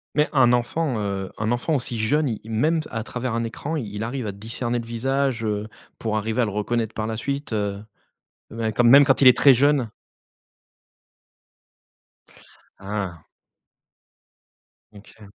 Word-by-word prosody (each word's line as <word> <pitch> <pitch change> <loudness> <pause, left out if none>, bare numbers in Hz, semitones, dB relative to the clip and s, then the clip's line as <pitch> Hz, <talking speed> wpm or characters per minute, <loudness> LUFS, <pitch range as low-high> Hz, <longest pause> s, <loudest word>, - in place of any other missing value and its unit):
Mais 150 +1 +2
un 125 -4 +4
enfant, 125 +2 0
heu, 100 -2 -3
un 110 +1 -1
enfant 125 +6 0
aussi 120 -3 -3
jeune, 145 +7 +1
il 110 0 -6
même 155 +9 +2
à 115 -2 -4
travers 125 0 -4
un 115 - -1
écran, 140 +7 -4
il 105 -8 -5
arrive 120 +2 -3
à - - -2
discerner 115 +4 -3
le 115 - -7
visage, 130 +1 -1
heu, 105 -1 -2 0.3
pour 110 -1 -1
arriver 110 +3 -1
à - - +3
le 105 - -3
reconnaître 110 +2 -2
par 110 - -3
la 110 0 -3
suite, 140 +4 -4
heu, 105 -1 -2 0.7
ben 110 -1 -2
comme 120 +1 +3
même 140 +4 +9
quand 135 -1 +2
il 135 - +8
est 125 - +6
très 140 - +7
jeune. 135 -2 +2 2.9
Ah. 95 -3 -5 1.7
OK. 105 +1 -15
115 Hz, 155 wpm, -23 LUFS, 110-135 Hz, 2.9 s, même